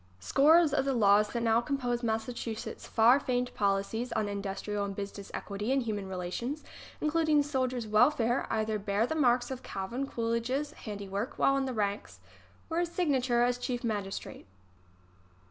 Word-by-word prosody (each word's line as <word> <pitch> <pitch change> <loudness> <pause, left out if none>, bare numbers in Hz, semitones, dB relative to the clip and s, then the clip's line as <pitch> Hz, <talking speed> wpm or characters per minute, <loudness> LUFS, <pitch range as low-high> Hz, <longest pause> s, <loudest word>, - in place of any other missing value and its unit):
Scores 300 - +5
of 295 - +2
the 270 -1 0
laws 210 -1 +4
that 235 -1 -2
now 230 0 +3
compose 245 -2 -1
Massachu 225 0 -2
setts' - - -7
far 235 +4 +5
famed 250 -2 -1
policies 205 +4 0
on 220 -2 0
industrial 200 +1 -3
and 200 -1 -4
business 200 0 -6
equity 205 +4 -4
and 270 -1 +2
human 205 -4 -3
relations, 190 - -4 0.4
including 305 -1 +2
soldiers' 255 -4 -1
wel 215 +5 +5
fare, 240 -4 0
either 215 -1 0
bear 200 +2 +1
the 285 - -2
marks 250 -4 +2
of 260 -1 -5
Calvin 235 +8 -4
Coolidge's 235 +5 -1
handiwork 205 +4 -5
while 275 - +3
in 275 -1 0
the 260 - -2
ranks 205 -1 -2 0.5
or 330 0 -1
his 345 -1 0
signature 265 -9 +2
as 245 0 +1
chief 245 0 -3
magistrate. 205 -4 -4
235 Hz, 165 wpm, -30 LUFS, 210-265 Hz, 0.5 s, Scores